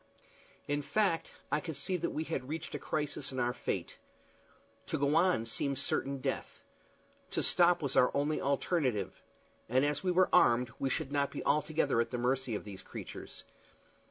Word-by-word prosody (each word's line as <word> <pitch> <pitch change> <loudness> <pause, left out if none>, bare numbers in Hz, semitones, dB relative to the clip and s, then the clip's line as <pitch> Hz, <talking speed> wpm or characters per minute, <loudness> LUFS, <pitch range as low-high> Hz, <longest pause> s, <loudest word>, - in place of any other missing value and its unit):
In 145 0 0
fact, 185 +1 +1 0.2
I 150 - +3
could 160 0 -5
see 185 - -2
that 170 - -1
we 155 - -2
had 140 -5 -4
reached 160 +1 -4
a - - -3
crisis 150 -3 -2
in 130 - -4
our 120 0 +1
fate. - - -4 0.9
To - - -1
go 145 +2 +2
on 170 -8 +3
seemed 135 +4 -1
certain 140 +1 0
death. - - -4 0.7
To - - -1
stop 175 -2 +4
was 140 - -1
our 125 - +6
only 145 +2 0
alternative; 135 - 0 0.5
and 130 +4 +3
as 145 +2 0
we 185 - +1
were 180 0 +4
armed 120 0 +5
we 135 - 0
should 135 - -2
not 140 -1 +1
be - - -6
altogether 150 -4 +2
at 115 - -2
the 125 - -3
mercy 125 -1 0
of - - -4
these 100 -2 -9
creatures. - - -8
140 Hz, 180 wpm, -32 LUFS, 125-160 Hz, 0.9 s, our